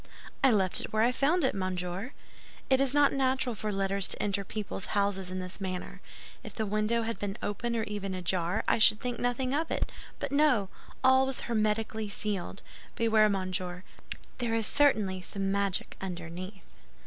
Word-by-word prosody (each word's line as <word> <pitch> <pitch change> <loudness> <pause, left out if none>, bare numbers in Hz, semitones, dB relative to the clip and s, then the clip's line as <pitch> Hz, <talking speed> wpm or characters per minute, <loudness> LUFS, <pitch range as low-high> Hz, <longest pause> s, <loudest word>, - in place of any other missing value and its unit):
"I 270 - +7
left 195 -6 +3
it - - -6
where 220 0 +2
I 240 - +4
found 295 +7 +2
it, 265 - +2
monsieur. 185 +4 -3 0.6
It 265 0 +5
is 275 -2 +4
not 290 0 +4
natural 260 -2 +1
for 215 0 -3
letters 195 0 0
to - - -1
enter 200 -1 0
people's 205 0 -4
houses 200 -2 +1
in 185 - -4
this 185 +1 -5
manner. 185 +1 -5 0.4
If 215 - -9
the 220 - -1
window 215 +3 +1
had 230 0 -3
been 200 +1 -3
open 235 +3 -2
or 225 - 0
even 200 -2 -4
ajar, 180 +2 -1
I - - +3
should 215 0 +6
think 245 -1 -3
nothing 250 +2 0
of 315 +3 0
it; - - -1 0.3
but, - - -4
no—all 260 -1 +2
was 265 - -1
hermetically 220 -1 -1
sealed. 200 -2 -3 0.3
Beware, 220 -2 +4
monsieur; 185 -2 -2 0.6
there 235 -2 0
is 225 -1 +1
certainly 215 -11 +2
some 195 +1 -3
magic 200 -1 -1
underneath." 180 +1 -6
210 Hz, 170 wpm, -30 LUFS, 190-240 Hz, 0.6 s, I